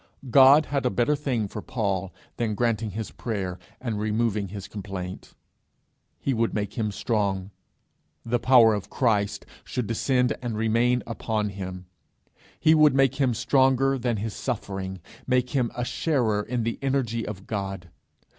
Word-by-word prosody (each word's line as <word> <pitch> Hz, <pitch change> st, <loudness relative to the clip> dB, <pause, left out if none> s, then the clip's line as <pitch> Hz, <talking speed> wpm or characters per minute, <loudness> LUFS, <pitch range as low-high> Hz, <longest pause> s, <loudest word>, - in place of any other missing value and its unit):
God 140 Hz, +3 st, +8 dB
had 140 Hz, -1 st, -1 dB
a 125 Hz, -, +2 dB
better 125 Hz, +5 st, +1 dB
thing 130 Hz, -7 st, -1 dB
for 105 Hz, -, -6 dB
Paul 95 Hz, -6 st, -2 dB, 0.3 s
than 110 Hz, -3 st, -1 dB
granting 115 Hz, -1 st, 0 dB
his 105 Hz, +2 st, -5 dB
prayer 95 Hz, -6 st, -4 dB, 0.2 s
and 115 Hz, -5 st, -3 dB
removing 110 Hz, -1 st, 0 dB
his 100 Hz, +1 st, -7 dB
complaint: 95 Hz, -3 st, -7 dB, 0.8 s
he 135 Hz, -, 0 dB
would 115 Hz, -1 st, 0 dB
make 105 Hz, -1 st, -2 dB
him 110 Hz, -2 st, -1 dB
strong; 100 Hz, -3 st, -1 dB, 0.7 s
the 120 Hz, +1 st, +1 dB
power 115 Hz, -2 st, +6 dB
of 105 Hz, -2 st, -4 dB
Christ 100 Hz, -5 st, 0 dB, 0.2 s
should 125 Hz, -3 st, -3 dB
descend 125 Hz, +3 st, +1 dB
and 120 Hz, -3 st, -3 dB
remain 115 Hz, +3 st, +2 dB
upon 110 Hz, -2 st, -2 dB
him; 95 Hz, -2 st, -7 dB, 0.7 s
he 155 Hz, -, +5 dB
would 155 Hz, -3 st, +5 dB
make 135 Hz, -1 st, +3 dB
him 130 Hz, -4 st, +2 dB
stronger 135 Hz, +1 st, +3 dB
than 120 Hz, -2 st, 0 dB
his 105 Hz, +1 st, -3 dB
suffering, 95 Hz, -6 st, -4 dB, 0.3 s
make 125 Hz, -1 st, +1 dB
him 125 Hz, -5 st, +1 dB
a 120 Hz, -, -2 dB
sharer 120 Hz, -9 st, 0 dB
in 120 Hz, +2 st, -2 dB
the 115 Hz, +1 st, -2 dB
energy 130 Hz, -4 st, 0 dB
of 100 Hz, -2 st, -7 dB
God. 95 Hz, -4 st, -4 dB
115 Hz, 155 wpm, -26 LUFS, 100-125 Hz, 0.8 s, God